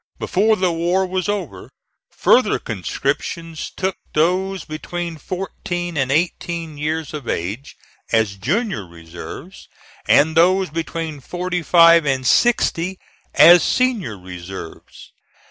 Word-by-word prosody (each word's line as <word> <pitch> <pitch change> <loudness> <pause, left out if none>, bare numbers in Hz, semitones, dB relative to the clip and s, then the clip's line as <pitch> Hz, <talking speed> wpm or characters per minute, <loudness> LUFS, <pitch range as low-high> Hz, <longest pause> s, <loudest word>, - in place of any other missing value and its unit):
Before 215 +4 +2
the 185 -3 +1
war 175 +3 +1
was 185 +1 -2
over, 175 - -4 0.4
further - - +3
conscriptions 165 -2 -4
took 190 0 -1 0.2
those 185 +3 +1
between 170 +2 -5
fourteen 175 0 -5
and 135 -2 0
eighteen 165 0 -2
years 155 0 -3
of 145 -6 -6
age 105 +12 -4 0.4
as 110 -3 +1
junior 200 - -1
reserves, 85 0 -11 0.4
and 155 +2 +4
those 185 +1 +3
between 160 -1 -4
forty 180 +5 -3
five 170 -1 +6
and 130 -2 0
sixty 185 - +2 0.4
as 170 +3 +8
senior 230 - 0
reserves. 90 -1 -10
165 Hz, 110 wpm, -20 LUFS, 140-185 Hz, 0.4 s, as